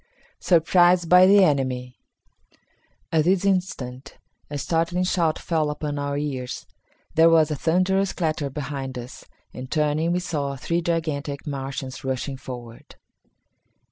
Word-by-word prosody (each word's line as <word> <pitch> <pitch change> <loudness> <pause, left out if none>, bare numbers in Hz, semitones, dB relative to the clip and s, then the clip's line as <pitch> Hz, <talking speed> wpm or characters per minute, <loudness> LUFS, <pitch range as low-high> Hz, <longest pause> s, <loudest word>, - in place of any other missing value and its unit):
Surprised 175 0 +4
by 180 +1 +8
the 200 0 +7
Enemy. 130 -5 0 1.2
At 155 -2 +2
this 185 +2 +2
instant, 140 -9 -2 0.3
a 145 - -4
startling 170 +4 0
shout 170 -4 +1
fell 160 -3 -1
upon 150 -1 -4
our 140 0 -2
ears. 135 -4 -4 0.5
There 165 +1 +6
was 160 -2 +4
a - - 0
thunderous 185 +6 +1
clatter 155 -4 -2
behind 135 -2 -5
us, 125 +2 -9 0.3
and, 130 0 -8
turning, 155 +2 +1
we 180 - +1
saw 145 -6 -3
three 170 +6 -1
gigantic 155 -4 -2
Martians 135 -2 -5
rushing 135 +1 -3
forward. 120 -3 -10
150 Hz, 130 wpm, -24 LUFS, 135-170 Hz, 1.2 s, by